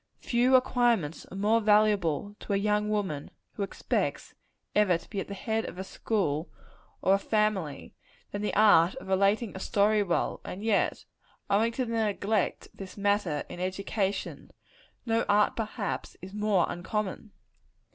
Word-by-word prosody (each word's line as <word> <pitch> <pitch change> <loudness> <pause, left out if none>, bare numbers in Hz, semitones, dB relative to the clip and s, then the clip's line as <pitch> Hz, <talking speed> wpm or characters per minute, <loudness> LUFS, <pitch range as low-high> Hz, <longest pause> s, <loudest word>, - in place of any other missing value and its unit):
Few 250 +2 +2
acquirements 240 - +2
are 190 - -9
more 215 +3 +3
valuable 205 -4 +2
to 205 - -4
a - - +3
young 210 +1 +1
woman 195 -9 -2 0.2
who - - -6
expects 195 - -2 0.4
ever 200 -5 +4
to - - -17
be 200 - -4
at - - -4
the 200 - -6
head 220 +2 -1
of 180 - -7
a 190 - -4
school 185 -6 -2 0.5
or 190 - +4
a 195 - +3
family, 210 -8 -1 0.4
than 205 - -4
the 210 - -2
art 195 -4 +5
of 265 - -9
relating 200 +3 +2
a - - -5
story 210 +2 +2
well; 175 -4 -1
and 195 +3 -7
yet, 220 -3 +1 0.5
owing 220 +4 +3
to 255 +1 -1
the 230 - -4
neglect 205 0 0
of - - -22
this 195 0 -9
matter 200 -7 0
in - - -9
education, 195 +2 -3 0.6
no 230 -1 +1
art, 205 0 +3
perhaps, 220 -1 -4
is 190 +2 -10
more 210 -4 +2
uncommon. 205 +4 -4
205 Hz, 160 wpm, -28 LUFS, 190-215 Hz, 0.6 s, art